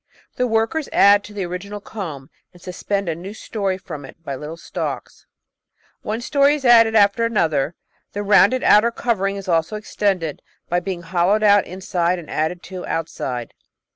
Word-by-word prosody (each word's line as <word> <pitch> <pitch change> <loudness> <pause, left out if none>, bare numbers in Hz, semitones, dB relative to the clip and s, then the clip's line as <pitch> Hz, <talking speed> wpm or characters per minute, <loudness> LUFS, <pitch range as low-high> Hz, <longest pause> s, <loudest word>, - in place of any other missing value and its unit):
The 250 - 0
workers 225 +7 0
add 200 +1 +5
to - - -11
the 200 -3 -3
original 190 +4 -6
comb 160 -11 -7 0.2
and 175 - -17
suspend 195 +2 -3
a 165 - 0
new 185 +6 -8
storey 200 -4 -3
from 165 -6 -8
it 135 - -12
by 140 - -5
little 150 +4 -7
stalks. - - -6 0.7
One 220 +1 -3
storey 280 +3 +3
is 280 -3 -6
added 230 -2 +6
after 205 +2 +4
another. 165 -9 0 0.4
The 205 - -3
rounded 205 +4 +4
outer 215 +3 +5
covering 205 -4 -1
is 195 -1 -7
also 165 +3 +1
extended, 195 -7 -2 0.3
by 175 - +1
being 180 -1 -5
hollowed 185 +5 +1
out 205 -1 +5
inside 180 -1 -1
and 170 -3 -10
added 160 +3 -2
to 185 -1 -8
outside. 130 -7 -4
195 Hz, 170 wpm, -21 LUFS, 170-215 Hz, 0.7 s, added